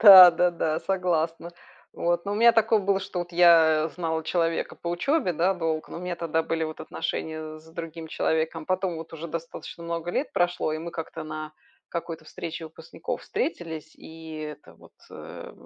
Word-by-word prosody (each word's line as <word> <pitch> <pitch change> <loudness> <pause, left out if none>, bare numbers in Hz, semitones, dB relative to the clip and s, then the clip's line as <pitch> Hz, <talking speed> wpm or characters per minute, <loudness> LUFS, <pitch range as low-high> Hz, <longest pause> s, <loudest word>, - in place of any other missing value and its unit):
Да, 190 -4 +12
да-да, 170 -2 +1
согласна. 170 -3 0 0.4
Вот, 170 +1 0
но 200 - -2
у - - 0
меня 235 +2 +7
такое 225 -1 +4
было, 195 -1 +2
что 185 - -5
вот 175 0 -4
я 165 -2 +6
знала 160 -2 -2
человека 165 0 0
по 170 - -5
учёбе, 185 - +1
да, 180 +5 +3
долго. 160 -2 -2
Но - - -6
у - - -8
меня 180 -1 -3
тогда 165 -1 0
были 165 0 -1
вот 155 0 -6
отношения 155 -1 -4
с 160 - -19
другим 165 0 -7
человеком. 160 0 0
Потом 185 -2 0
вот 160 0 -8
уже 165 +1 -6
достаточно 165 +1 -7
много 170 +1 -3
лет 285 - -1
прошло, 175 -4 +1
и 155 - -2
мы 170 +1 -6
как-то 160 -1 -6
на 155 0 -6 0.4
какой-то 165 -2 -5
встрече 165 +1 -6
выпускников 160 - -6
встретились. 160 - -3
И 160 -1 -10
это 150 -1 -8
вот, - - -19 0.2
э, - - -9
165 Hz, 180 wpm, -26 LUFS, 160-180 Hz, 0.4 s, Да